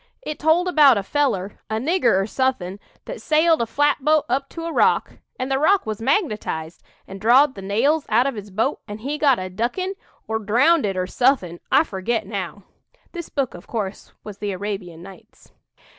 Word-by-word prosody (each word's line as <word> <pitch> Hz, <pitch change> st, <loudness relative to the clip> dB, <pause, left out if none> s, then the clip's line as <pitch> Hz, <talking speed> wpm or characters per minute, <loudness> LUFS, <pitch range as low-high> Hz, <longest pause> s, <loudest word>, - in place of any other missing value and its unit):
It 305 Hz, -, -5 dB
told 320 Hz, +4 st, +3 dB
about 295 Hz, -8 st, +6 dB
a 200 Hz, -, -1 dB
feller, 205 Hz, -6 st, -1 dB
a 220 Hz, -, -1 dB
nigger 245 Hz, -, +2 dB
or 195 Hz, -, 0 dB
suthin', 205 Hz, -6 st, -2 dB, 0.3 s
that -, -, -7 dB
sailed 320 Hz, 0 st, +3 dB
a 230 Hz, -, -1 dB
flatboat 295 Hz, +3 st, +2 dB
up 275 Hz, +1 st, -1 dB
to 330 Hz, -1 st, -7 dB
a 335 Hz, -, -4 dB
rock, -, -, +2 dB, 0.2 s
and 255 Hz, +1 st, -3 dB
the 270 Hz, -, +1 dB
rock 380 Hz, +6 st, +3 dB
was 215 Hz, 0 st, -4 dB
magnetized 215 Hz, -, -1 dB, 0.3 s
and 195 Hz, 0 st, -9 dB
drawed 260 Hz, +6 st, +5 dB
the 195 Hz, -, -9 dB
nails 250 Hz, +11 st, +1 dB
out 235 Hz, +4 st, +3 dB
of 275 Hz, -, 0 dB
his 210 Hz, -2 st, -8 dB
boat, 210 Hz, +4 st, -1 dB
an' 205 Hz, -1 st, -6 dB
he 280 Hz, +7 st, -4 dB
got 275 Hz, -5 st, +4 dB
a 185 Hz, -, -4 dB
duckin', 240 Hz, -, -2 dB, 0.3 s
or 220 Hz, 0 st, -1 dB
drownded, 225 Hz, -, +2 dB
or 185 Hz, -, 0 dB
suthin', 190 Hz, -6 st, +1 dB
I -, -, +5 dB
forget 220 Hz, -, -2 dB
now. 200 Hz, -1 st, -5 dB, 0.5 s
(This 340 Hz, -2 st, -7 dB
book, 275 Hz, -4 st, -2 dB
of 175 Hz, -, -12 dB
course, 205 Hz, -4 st, -5 dB
was 205 Hz, -2 st, -9 dB
'The 205 Hz, -1 st, -3 dB
Arabian 185 Hz, -4 st, -6 dB
Nights.') 195 Hz, +4 st, -16 dB
230 Hz, 190 wpm, -22 LUFS, 200-290 Hz, 0.5 s, about